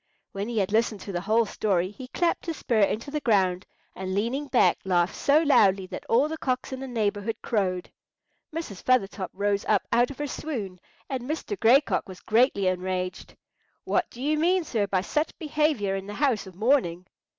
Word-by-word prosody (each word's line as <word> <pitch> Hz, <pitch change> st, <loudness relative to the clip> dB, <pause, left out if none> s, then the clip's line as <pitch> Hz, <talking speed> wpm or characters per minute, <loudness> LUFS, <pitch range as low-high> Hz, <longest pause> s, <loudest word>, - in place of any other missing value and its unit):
When 200 Hz, +3 st, -4 dB
he 235 Hz, -, -3 dB
had 195 Hz, -1 st, +1 dB
listened 220 Hz, -1 st, +1 dB
to 200 Hz, -, -6 dB
the 175 Hz, -2 st, -2 dB
whole 220 Hz, +4 st, +2 dB
story, 190 Hz, -3 st, 0 dB
he 255 Hz, +4 st, -10 dB
clapped 345 Hz, +5 st, -1 dB
his 330 Hz, -, -3 dB
spur 230 Hz, -3 st, 0 dB
into 220 Hz, +7 st, 0 dB
the 300 Hz, -, -1 dB
ground, 190 Hz, -7 st, +2 dB, 0.3 s
and 185 Hz, 0 st, -4 dB
leaning 245 Hz, +8 st, -1 dB
back 255 Hz, -2 st, +3 dB
laughed 180 Hz, -1 st, +1 dB
so 300 Hz, +3 st, +3 dB
loudly 195 Hz, -, +4 dB
that -, -, -8 dB
all 255 Hz, +6 st, +4 dB
the 320 Hz, 0 st, -5 dB
cocks 255 Hz, 0 st, -2 dB
in 260 Hz, -, -5 dB
the 270 Hz, -, -6 dB
neighbourhood 220 Hz, -2 st, -1 dB
crowed. 185 Hz, -5 st, -1 dB, 0.6 s
Mrs. 310 Hz, -, -6 dB
Feathertop 200 Hz, -6 st, +1 dB
rose 200 Hz, +1 st, 0 dB
up 210 Hz, -2 st, +2 dB
out 240 Hz, +1 st, +3 dB
of 280 Hz, -, -9 dB
her 295 Hz, -, -2 dB
swoon, 225 Hz, -, -5 dB, 0.3 s
and 255 Hz, -1 st, -4 dB
Mr. 320 Hz, +6 st, -3 dB
Gray 245 Hz, +5 st, +6 dB
Cock 285 Hz, -, -2 dB
was 185 Hz, -, -9 dB
greatly 220 Hz, -3 st, +2 dB
enraged. 185 Hz, 0 st, -2 dB, 0.5 s
"What 355 Hz, -2 st, 0 dB
do 245 Hz, -, -9 dB
you 305 Hz, +2 st, +1 dB
mean, 360 Hz, +3 st, +3 dB
sir, 220 Hz, -9 st, -1 dB
by 185 Hz, -1 st, +1 dB
such 300 Hz, -, -2 dB
behaviour 300 Hz, -, 0 dB
in 195 Hz, 0 st, -5 dB
the 205 Hz, -, -6 dB
house 255 Hz, -8 st, +1 dB
of 185 Hz, -, -12 dB
mourning?" 190 Hz, -6 st, +1 dB
220 Hz, 195 wpm, -26 LUFS, 195-275 Hz, 0.6 s, Gray